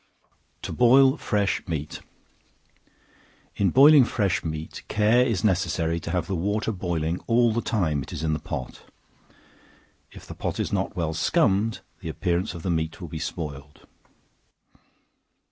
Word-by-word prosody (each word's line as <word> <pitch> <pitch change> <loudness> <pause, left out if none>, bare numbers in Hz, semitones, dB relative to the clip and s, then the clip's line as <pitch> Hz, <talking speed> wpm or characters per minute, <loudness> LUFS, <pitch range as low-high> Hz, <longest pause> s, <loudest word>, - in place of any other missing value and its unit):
To - - -5
Boil 130 +3 +5
Fresh 105 -10 -1
Meat. 75 -3 -4 1.6
In 100 - +2
boiling 140 +1 +7
fresh 100 -7 0
meat, 80 0 -6
care 110 +4 +3
is 115 -8 -1
necessary 90 -4 0
to 85 - -7
have 90 -1 -1
the 95 - -3
water 105 +6 -1
boiling 85 -3 -2
all 115 -1 +3
the 120 - 0
time 80 -12 0
it 65 - -9
is 75 - -5
in 80 -1 0
the 75 - -2
pot; 60 - -6 1.3
if - - -13
the - - -8
pot - - -4
is - - -2
not - - -1
well 80 -3 -2
scummed, 110 - +1 0.2
the - - -6
appearance 90 +2 -2
of 85 - -8
the 90 - -1
meat 80 -1 -2
will 85 -3 -8
be 80 - -6
spoiled. 75 -3 -7
90 Hz, 150 wpm, -25 LUFS, 80-110 Hz, 1.6 s, boiling